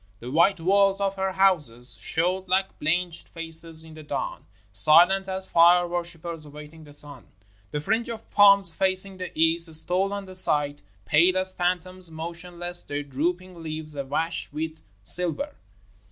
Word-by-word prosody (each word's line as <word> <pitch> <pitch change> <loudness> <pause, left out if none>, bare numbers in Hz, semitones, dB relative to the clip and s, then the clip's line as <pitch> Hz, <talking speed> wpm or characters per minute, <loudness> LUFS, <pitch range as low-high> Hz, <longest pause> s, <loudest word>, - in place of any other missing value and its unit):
The 120 +2 -9
white 170 +5 +2
walls 195 +3 +2
of 195 -1 -1
her 190 -1 -3
houses 150 -11 +1
showed 180 - -2
like 190 +1 -1
blanched 170 +2 -2
faces 165 -1 -1
in 160 -1 -14
the 155 - -12
dawn 150 - -6 0.2
— 105 -1 -36
silent 185 +5 +4
as 190 0 -4
fire 175 +1 +4
worshipers 170 -2 -6
awaiting 150 +2 -13
the 145 - -15
sun. 145 0 -9 0.4
The 150 - -5
fringe 225 +9 -2
of 230 -1 -8
palms 200 -3 +6
facing 190 +1 +4
the 180 -1 -7
east 165 +1 +3
stole 185 +5 +2
on 200 -1 -6
the 185 - -12
sight, 145 -5 +3 0.2
pale 175 +4 +3
as 185 0 +2
phantoms, 180 0 -4
motionless, 175 +2 -4
their 145 0 -5
drooping 175 +6 -4
leaves 155 -1 -2
awash 145 +4 -4
with 155 +2 -6 0.2
silver. 180 - 0
170 Hz, 155 wpm, -24 LUFS, 155-185 Hz, 0.4 s, palms